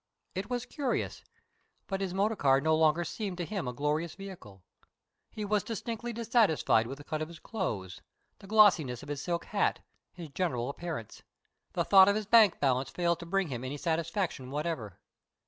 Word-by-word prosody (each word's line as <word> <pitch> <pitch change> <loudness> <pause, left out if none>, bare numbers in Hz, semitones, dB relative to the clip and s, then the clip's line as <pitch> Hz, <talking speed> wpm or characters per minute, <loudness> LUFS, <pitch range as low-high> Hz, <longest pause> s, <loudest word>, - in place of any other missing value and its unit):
It 190 +2 -4
was 245 -1 -2
curious, 275 -5 -2 0.6
but 195 -1 -3
his 190 -2 -2
motor 200 +4 +1
car 135 -7 +4
no 160 +2 +2
longer 160 +2 +3
seemed 195 +1 -4
to 175 - -2
him 195 -6 -4
a - - -1
glorious 150 +5 -1
vehicle. 175 - -11 0.7
He 215 - -5
was 210 -1 +1
distinctly 230 +1 -4
dissatisfied 225 - +2
with 135 +3 -6
the 145 - -11
cut 155 +1 -4
of 155 - -2
his 170 0 -11
clothes, 115 - -4 0.4
the 195 - -13
glossiness 180 - +4
of 145 - -10
his 145 -1 -3
silk 170 0 -2
hat, 205 -1 0 0.3
his 170 -4 -9
general 135 -6 -1
appearance. 155 -8 -6 0.5
The - - +1
thought 190 -1 +8
of 200 - +2
his 215 0 -2
bank 215 -2 +6
balance 130 -2 +1
failed 170 -1 0
to 170 - -8
bring 195 -1 0
him 125 -2 -4
any 135 +3 -4
satisfaction 165 -3 -2
whatever. 145 - -3
170 Hz, 180 wpm, -30 LUFS, 145-200 Hz, 0.7 s, thought